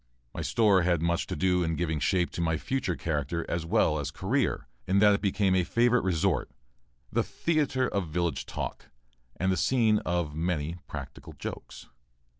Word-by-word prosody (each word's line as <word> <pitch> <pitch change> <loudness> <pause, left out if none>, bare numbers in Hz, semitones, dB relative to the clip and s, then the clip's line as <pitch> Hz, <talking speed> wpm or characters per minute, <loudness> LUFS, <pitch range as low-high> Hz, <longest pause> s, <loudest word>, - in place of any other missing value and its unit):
My - - -4
store 105 -5 +3
had 85 -1 +2
much 85 0 0
to - - -3
do 90 +2 +2
in 80 -1 0
giving 80 -1 -1
shape 90 +4 +1
to - - -4
my 80 -1 +1
future 130 - -2
character 75 +3 -2
as 85 -1 -2
well 80 -6 +2
as 70 -1 -3
career, 105 - -1 0.2
in 95 - +2
that 105 +1 +6
it 100 - 0
became 100 -1 +2
a 95 -1 +3
favorite 120 +5 +2
resort; 90 -4 +1 0.6
the - - +2
theatre 145 -6 0
of 100 -4 -2
village 85 -1 -2
talk, - - -5 0.5
and 95 +1 0
the 95 - 0
scene 110 +1 +3
of 85 -4 -2
many 80 0 -2
practical - - -8
jokes. - - -8
90 Hz, 175 wpm, -28 LUFS, 80-105 Hz, 0.6 s, that